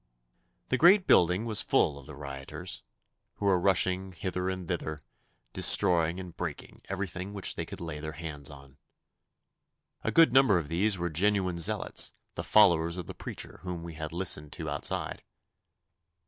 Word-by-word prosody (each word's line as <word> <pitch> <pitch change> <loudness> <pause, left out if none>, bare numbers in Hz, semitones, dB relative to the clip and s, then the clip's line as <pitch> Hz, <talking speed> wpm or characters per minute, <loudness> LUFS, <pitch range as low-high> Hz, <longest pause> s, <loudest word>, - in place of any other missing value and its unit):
The 130 - +1
great 185 +5 +6
building 90 +5 +4
was 110 -3 +2
full 70 - +1
of 70 - -13
the 75 - -9
rioters, 70 -2 -6 0.5
who 105 - -5
were 95 -2 +3
rushing 95 0 +1
hither 90 0 -3
and 95 -2 -5
thither, 80 -3 -3 0.6
destroying 85 0 +3
and 90 -3 -9
breaking 80 -5 -7
everything 95 0 -4
which 100 -2 +2
they - - -5
could - - -8
lay 80 -3 -6
their 80 +1 -6
hands 75 -3 -3
on. 70 -1 -14 1.3
A - - -1
good 165 -5 +5
number 130 -8 +5
of 75 -4 -3
these 95 +5 +1
were 85 -1 -3
genuine 95 0 +1
zealots, 85 - +2 0.2
the - - -5
followers 85 -5 +4
of 90 - -5
the - - -8
preacher - - -7
whom 90 -2 -6
we 85 -1 -8
had 80 0 -6
listened 80 -4 -1
to - - -5
outside. - - -2
90 Hz, 160 wpm, -29 LUFS, 80-95 Hz, 1.3 s, great